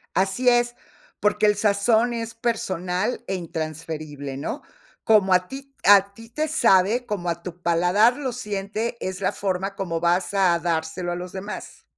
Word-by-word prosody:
Así 195 +7 +1
es, 240 0 +3 0.4
porque 210 +1 +2
el 210 -1 +3
sazón 220 +3 +2
es 230 -1 -4
personal 195 -3 -2
e 195 - -2
intransferible, 155 -4 -5
¿no?, 190 - -5 0.4
como 200 -4 +4
a 180 0 +2
ti 275 0 -9
a 200 0 +6
ti 225 +2 -13
te 310 +5 -2
sabe, 230 -6 +3
como 205 -7 -4
a 170 0 -2
tu 175 -1 -8
paladar 180 +8 +3
lo 265 -4 -3
siente, 210 0 -3
es 190 0 -4
la 190 - 0
forma 195 0 -2
como 170 -4 -3
vas 175 +3 +1
a 185 -4 +3
dárselo 170 +1 -2
a - - -1
los 180 +1 -7
demás. 195 +2 -8
195 Hz, 165 wpm, -23 LUFS, 175-225 Hz, 0.4 s, a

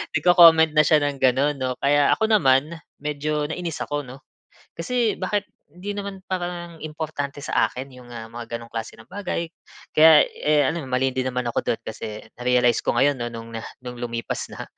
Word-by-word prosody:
nagco-comment 165 -3 +7
na 155 - +6
siya 155 - +5
ng 145 -1 -1
gano'n 135 +3 +3
'no? 130 -1 -2
Kaya 145 +1 +4
ako 220 0 0
naman, 150 -5 +3 0.2
medyo 150 +1 -2
nainis 165 0 -4
ako 145 0 -3
'no? 130 +3 -12 0.5
Kasi, 230 +6 -1
bakit 205 -1 -1 0.3
hindi 200 +4 -6
naman 200 -1 -6
parang 175 -2 -4
importante 150 -2 -5
sa 140 - +1
akin 130 +2 -7
yung 125 -1 -14
mga 115 +1 -8
ganong 115 0 -10
klase 115 -1 -5
ng 110 - -16
bagay, 185 -3 -3 0.5
kaya, 155 -1 +8 0.2
eh, 150 -1 +3
ano 165 -2 -3
mali 130 +1 +1
din 130 - 0
naman 125 0 -2
ako 120 - 0
do'n - - -1
kasi, 110 -1 -6 0.2
na-realize 125 -1 +2
ko - - +2
ngayon 145 0 +3
'no, 120 - -2
no'ng 115 0 -8 0.3
no'ng 125 0 -7
lumipas 115 -1 -4
na. - - -7
145 Hz, 180 wpm, -23 LUFS, 125-170 Hz, 0.5 s, kaya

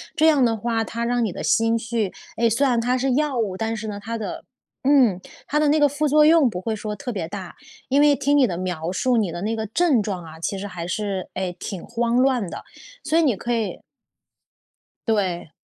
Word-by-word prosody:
这 320 -1 +4
样 290 -5 +5
的 225 -2 +2
话， 225 0 -1
它 235 +1 -4
让 240 0 +1
你 210 - -1
的 - - -6
心 225 0 +2
绪 225 -3 -2 0.2
哎， 230 0 +2
虽 275 +6 +2
然 240 -2 +2
它 250 +2 +1
是 260 0 +1
药 290 -2 0
物， 205 -5 -1
但 225 +2 -2
是 215 +1 -5
呢 205 -1 -5
它 230 +2 -4
的 220 - -5 0.4
嗯， 255 -9 +4 0.3
它 300 - +1
的 305 - +3
那 300 +1 +3
个 290 -1 +5
副 295 +2 0
作 300 +1 +5
用 315 -5 +5
不 180 -3 -5
会 220 +2 -2
说 210 0 -5
特 245 +5 -5
别 180 -7 -3
大， 185 -2 -7 0.4
因 275 +2 +3
为 295 -1 +5
听 285 +2 +2
你 265 - +5
的 175 -3 -3
描 180 -2 -3
述， 245 +5 +1
你 205 -5 +1
的 175 +1 -6
那 220 +2 -1
个 220 0 -3
症 285 -1 +2
状 190 -4 -4
啊， 160 0 -11
其 195 +4 -2
实 200 - -5
还 175 -3 -6
是， 195 0 -3
哎， 185 -1 -3
挺 190 -4 -6
慌 235 0 -1
乱 255 -7 +2
的， - - -7 0.4
所 320 +2 +2
以 - - +5
你 265 -9 +2
可 240 +5 -3
以 225 -3 -2 1.3
对。 185 -7 0
225 Hz, 250 characters per minute, -23 LUFS, 195-260 Hz, 1.3 s, 样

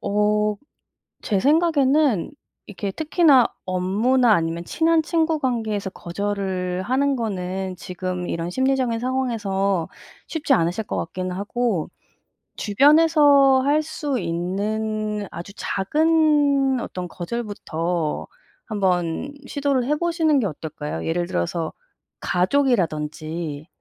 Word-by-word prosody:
어 210 +1 +1 0.7
제 200 -3 0
생각에는 290 - +3 0.4
이렇게 200 -1 -5
특히나 305 - +4 0.2
업무나 210 +7 +2
아니면 165 0 -1
친한 325 - +2
친구 320 -1 0
관계에서 220 -6 -1
거절을 185 -1 -3
하는 270 +6 +1
거는 190 -4 -3
지금 180 -1 -5
이런 170 +1 -3
심리적인 260 0 0
상황에서 205 -8 -1 0.4
쉽지 305 -3 -1
않으실 180 -1 +1
것 - - -4
같기는 185 +2 -4
하고 205 -2 -2 0.7
주변에서 285 +2 +5
할 300 +2 +3
수 295 -4 -3
있는 210 +4 -2
아주 175 +3 -8
작은 290 +3 +2
어떤 180 -5 -5
거절부터 175 -5 -3 0.4
한번 185 - -1
시도를 280 -3 0
해보시는 315 0 +1
게 215 - 0
어떨까요? 150 - -6
예를 175 +1 -1
들어서 160 - -2 0.5
가족이라든지 165 - -1
210 Hz, 250 characters per minute, -22 LUFS, 180-275 Hz, 0.7 s, 주변에서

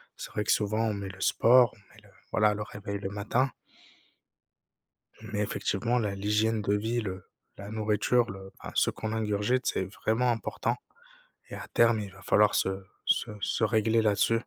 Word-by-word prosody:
C'est - - -8
vrai 105 - -1
que - - +2
souvent 110 +1 0
on 110 - 0
met 100 -1 -5
le 95 0 -11
sport 120 0 +5
on - - -22 0.2
met - - -17
le - - -19 0.2
voilà 105 +1 +3
le 105 0 -4
réveil 100 -1 -6
le 95 - -4
matin 110 +6 0 1.7
mais 105 - -5
effectivement 115 +4 0
la 105 -3 -1
l'hygiène 105 +2 +1
de 100 0 0
vie 115 +3 0
le 95 -3 -5 0.4
la 100 +1 -7
nourriture 110 +2 +1
le 95 0 -10
enfin - - -8
ce - - +3
qu'on 110 0 -4
ingurgite 110 +3 0
c'est 95 - 0
vraiment 110 +5 0
important 115 - -2 0.8
et - - -6
à - - -7
terme 115 -1 +4
il 100 -3 -7
va 100 - -15
falloir 105 +3 +4
se 95 0 0 0.2
se - - +2
se - - -1
régler 110 0 +2
là-dessus. 105 +1 +2
105 Hz, 180 wpm, -29 LUFS, 100-115 Hz, 1.7 s, sport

